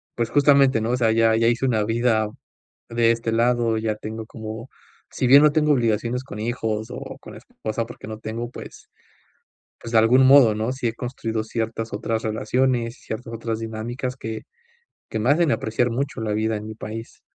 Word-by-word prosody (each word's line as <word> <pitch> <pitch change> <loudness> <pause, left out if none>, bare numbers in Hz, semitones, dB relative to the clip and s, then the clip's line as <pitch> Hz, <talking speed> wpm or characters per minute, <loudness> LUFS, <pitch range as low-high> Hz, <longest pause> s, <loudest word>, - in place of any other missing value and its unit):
pues, 115 -1 -1
justamente, 140 -4 +4
¿no?, 115 +2 -1
o 125 - +1
sea, 115 -3 +3
ya 115 0 +4
ya 115 +1 +3
hice 120 +3 +1
una 110 -4 +1
vida 115 0 +1 0.6
de 115 0 +3
este 115 0 -1
lado. 115 0 +2
Ya 110 -1 -1
tengo 110 +1 -7
como, 110 +2 -8 0.4
si 130 - -1
bien 140 +3 +8
no 150 - +6
tengo 150 0 +3
obligaciones 120 0 0
con 120 -6 -9
hijos 110 -1 -2
o - - -7
con - - -11
esposa, 110 +1 -5
porque 120 -2 -11
no 110 0 -7
tengo, 115 +2 -5
pues, - - -11 0.9
pues 115 - -8
de 115 - +5
algún 125 +4 +5
modo, 130 -5 +7
¿no?, 110 +4 -1
sí 130 -2 -2
he 115 - -4
construido 115 -2 -3
ciertas 115 0 -3
otras 110 +2 -2
relaciones 115 +2 0
y - - -23
ciertas 115 +1 -6
otras 115 -1 -3
dinámicas 120 +3 -4
que 110 -3 -6 0.7
que 110 - -3
me 115 +4 +1
hacen 160 0 +3
apreciar 120 +1 0
mucho 135 0 -3
la 110 -1 -2
vida 110 +1 0
en 105 - -7
mi 110 - -6
país. 115 +1 -8
115 Hz, 195 wpm, -23 LUFS, 110-125 Hz, 0.9 s, bien